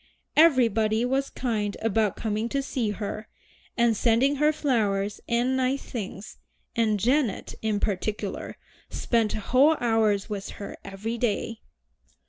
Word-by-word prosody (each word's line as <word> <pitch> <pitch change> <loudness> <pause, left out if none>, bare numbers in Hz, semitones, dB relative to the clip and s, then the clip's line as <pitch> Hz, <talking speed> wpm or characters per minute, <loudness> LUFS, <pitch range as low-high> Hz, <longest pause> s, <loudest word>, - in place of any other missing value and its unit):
Everybody 230 -7 +4
was 270 +2 0
kind 210 -5 -2
about 220 -2 +1
coming 220 +1 -2
to 275 +2 -1
see 245 -5 -1
her, 210 +1 -5 0.5
and 235 -2 +3
sending 245 +6 +3
her 300 +2 +4
flowers 210 -9 0
and 245 +2 +2
nice 260 +1 0
things, 205 -3 -7 0.4
and 220 -3 +2
Janet, 245 +1 +1
in 215 -2 0
particular, 205 0 -3 0.3
spent 230 -3 0
whole 260 +9 +3
hours 220 -4 +2
with 205 -3 -5
her 200 - -7
every 215 +4 -5
day. 225 0 -1
225 Hz, 125 wpm, -26 LUFS, 210-255 Hz, 0.5 s, Everybody